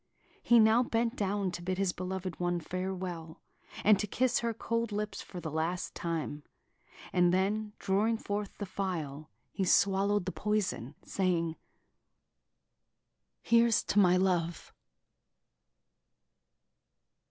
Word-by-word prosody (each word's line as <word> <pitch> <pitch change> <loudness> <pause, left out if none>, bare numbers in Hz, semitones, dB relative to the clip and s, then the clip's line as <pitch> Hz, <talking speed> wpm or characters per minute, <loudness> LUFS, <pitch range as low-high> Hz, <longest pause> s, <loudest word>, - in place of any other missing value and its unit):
He 240 - +5
now 220 +2 +6
bent 235 0 0
down 200 -2 -1
to 175 - -6
bid 185 +1 -2
his 195 -2 +1
beloved 185 -1 -5
one 175 0 0
farewell, 180 -2 -5 0.4
and 210 -1 +6
to 210 - -1
kiss 250 +4 +1
her 235 -1 -1
cold 230 0 -2
lips 210 +1 -3
for 180 - -8
the 160 -2 -5
last 165 +3 -2
time; 160 -3 -3 0.7
and 175 -1 +4
then, 205 +3 0
drawing 210 +4 +1
forth 205 -2 -4
the 205 - -4
phial, 160 -7 -4 0.2
he 195 - -2
swallowed 195 +1 +3
the 185 - -2
poison, 205 - -2
saying: 170 -4 0 1.9
"Here's 235 -1 +4
to 205 - +1
my 180 -2 +5
love!... 175 -3 0
190 Hz, 120 wpm, -31 LUFS, 175-210 Hz, 1.9 s, now